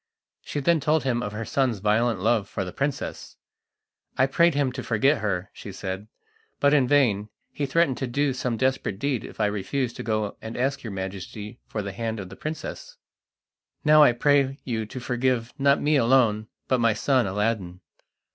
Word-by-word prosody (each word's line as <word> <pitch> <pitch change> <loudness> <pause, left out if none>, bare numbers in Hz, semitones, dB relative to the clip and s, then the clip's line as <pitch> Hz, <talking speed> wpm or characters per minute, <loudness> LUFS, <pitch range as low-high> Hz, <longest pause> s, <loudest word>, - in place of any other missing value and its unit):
She 145 - -4
then 170 +3 +3
told 150 +1 +1
him 120 -2 0
of 105 - -3
her 110 +2 -5
son's 130 -3 +1
violent 105 +2 +1
love 110 +1 +1
for 95 - -3
the 90 - -7
princess. 140 0 -4 0.8
"I 130 - +5
prayed 170 +4 +3
him 140 -3 +1
to 130 +1 -5
forget 130 +6 +2
her," 100 -2 -2
she 100 - -9
said, 95 +1 -5 0.5
"but 145 0 +4
in 135 -4 +4
vain; 115 -7 +2 0.2
he 145 - -2
threatened 140 -2 +2
to 130 - -2
do 140 +3 0
some 125 -2 -2
desperate 130 -5 0
deed 135 0 -1
if - - -11
I 105 - +3
refused 105 +5 -2
to - - -5
go 110 -2 -2
and 110 +1 -7
ask 135 +2 0
your 115 - -6
Majesty 100 +3 -6
for 105 - -4
the 100 - -4
hand 110 +2 -3
of 95 -2 -7
the 95 - -10
princess. 160 - -6 0.9
Now 155 0 +7
I 145 -5 +7
pray 140 +1 +2
you 110 -4 -3
to 130 - -7
forgive 125 -1 -1
not 140 0 +4
me 150 0 +2
alone, 115 -4 +3 0.2
but 130 - +2
my 115 -1 +3
son 130 -1 +2
Aladdin." 95 -3 -2
120 Hz, 190 wpm, -25 LUFS, 105-140 Hz, 0.9 s, Now